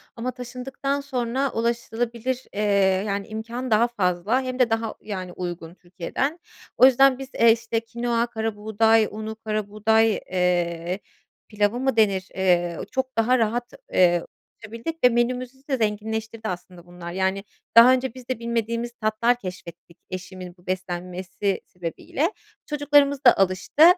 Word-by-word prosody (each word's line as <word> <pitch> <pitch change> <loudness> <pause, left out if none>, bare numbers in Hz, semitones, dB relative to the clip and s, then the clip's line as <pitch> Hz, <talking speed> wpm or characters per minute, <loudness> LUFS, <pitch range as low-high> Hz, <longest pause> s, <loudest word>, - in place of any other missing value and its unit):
Ama 245 +2 -3
taşındıktan 260 +3 -4
sonra 260 -1 -1
ulaşılabilir, 235 +2 -2
eee, 205 - -2 0.5
yani, 200 0 -2
imkân 230 +3 -5
daha 225 +3 +5
fazla 205 +2 0
hem 255 0 -4
de 250 -2 +4
daha, 225 -1 -1
yani, 185 -4 -5
uygun 175 -2 -6
Türkiye'den. 190 - -3 0.4
O - - +8
yüzden 265 0 +5
biz, 270 -1 -7
eee, 230 0 +7
işte, 230 0 0
kinoa, 235 +1 -1
karabuğday 220 -1 +2
unu, 220 +1 -5
karabuğday, 215 +1 +1 0.2
eee, 175 0 0 0.5
pilavı 210 +2 0
mı 265 -1 0
denir, 195 -4 +2
eee, 175 -3 +2
çok 260 -1 -2
daha 245 +3 +4
rahat, 235 +2 -1 0.2
eee, 175 -2 +4 0.4
ulaşabildik 230 +10 -6
ve 250 - +8
menümüzü 250 +2 -1
de 265 - +1
zenginleştirdi, 220 0 -2
aslında, 180 -1 -7
bunlar. 175 -1 -9
Yani, 190 +2 -1 0.3
daha 235 +2 +10
önce 260 -2 -1
biz 255 -1 -12
de 255 - -2
bilmediğimiz 235 0 -2
tatlar 220 +3 +2
keşfettik 175 -3 -9
eşimin 185 -1 -7
bu 175 - -24
beslenmesi 185 +1 -3
sebebiyle. 180 - -3 0.3
Çocuklarımız 290 -1 +3
da 245 - +8
alıştı, 190 - +2
225 Hz, 140 wpm, -24 LUFS, 185-245 Hz, 0.5 s, daha